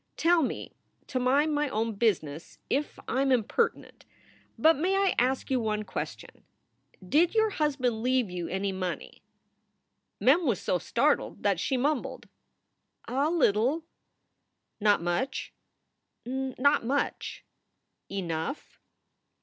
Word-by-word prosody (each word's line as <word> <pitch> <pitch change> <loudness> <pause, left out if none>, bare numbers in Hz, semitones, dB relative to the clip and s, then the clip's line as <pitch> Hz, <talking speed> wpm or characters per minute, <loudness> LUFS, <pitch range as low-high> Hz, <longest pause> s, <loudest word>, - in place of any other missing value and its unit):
"Tell 340 0 +4
me 270 - -3 0.3
to 255 - -2
mind 280 +5 +3
my 295 -1 +1
own 225 0 -1
business 170 -8 -1
if 290 +2 -1
I 260 - 0
m 275 -1 +2
impertinent, 255 - 0 0.5
but 320 +1 +5
may 360 +7 +1
I 390 -1 +3
ask 260 +2 0
you 260 - +3
one 215 -2 -1
question? - - -7 0.6
Did 330 - +3
your 440 -1 +3
husband 270 - 0
leave 255 -1 +2
you 175 -1 -4
any 195 +1 -1
money?" 185 -1 -5 1.0
Mem 300 +6 +4
was 225 -7 +1
so 180 - 0
startled - - 0
that - - +2
she 265 - 0
mumbled: 285 +1 -1 0.8
"A 275 +5 +1
little." 280 -1 +2 1.0
"Not 205 -4 +3
much?" 175 +11 -2 0.7
"Not 265 +2 +1
much." 275 +5 -2 0.6
"Enough?" 175 - -4
260 Hz, 120 wpm, -28 LUFS, 215-295 Hz, 1.0 s, but